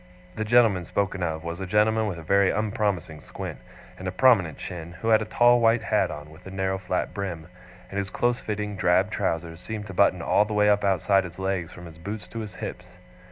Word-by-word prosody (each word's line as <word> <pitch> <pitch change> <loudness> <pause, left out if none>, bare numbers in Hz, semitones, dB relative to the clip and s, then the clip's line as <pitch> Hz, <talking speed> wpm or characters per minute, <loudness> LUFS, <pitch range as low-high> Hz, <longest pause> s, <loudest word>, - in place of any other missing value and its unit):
The 110 - -2
gentleman 110 -5 +4
spoken 95 +2 -1
of 80 -2 -2
was 85 +1 -5
a 95 - -4
gentleman 110 +2 +2
with 95 -5 -4
a 80 - -9
very 100 +4 +3
unpromising 100 -7 -1
squint, - - -7 0.4
and 95 - -5
a - - -1
prominent 95 - +4
chin, 85 -1 -7
who 110 +5 -3
had 110 -1 +5
a - - -2
tall 120 +2 +4
white 115 0 +3
hat - - +1
on 75 +1 -8
with 85 +4 -14
a - - -6
narrow 95 0 -2
flat 90 -1 -2
brim, 90 -5 -4 0.5
and 100 - -2
whose 100 -1 -3
close 120 +5 0
fitting 105 -1 -4
drab 95 +2 +2
trousers 85 -5 -2
seemed 105 +2 -6
to 95 - -8
button 90 -2 +3
all - - +4
the 105 0 -4
way 105 0 +5
up 105 0 +2
outside 95 0 +3
his 85 -2 -9
legs 95 -3 -2
from 90 - -11
his 80 -1 -12
boots 100 +2 -6
to 115 - -6
his 105 -3 -7
hips. - - -8
95 Hz, 225 wpm, -25 LUFS, 90-105 Hz, 0.5 s, had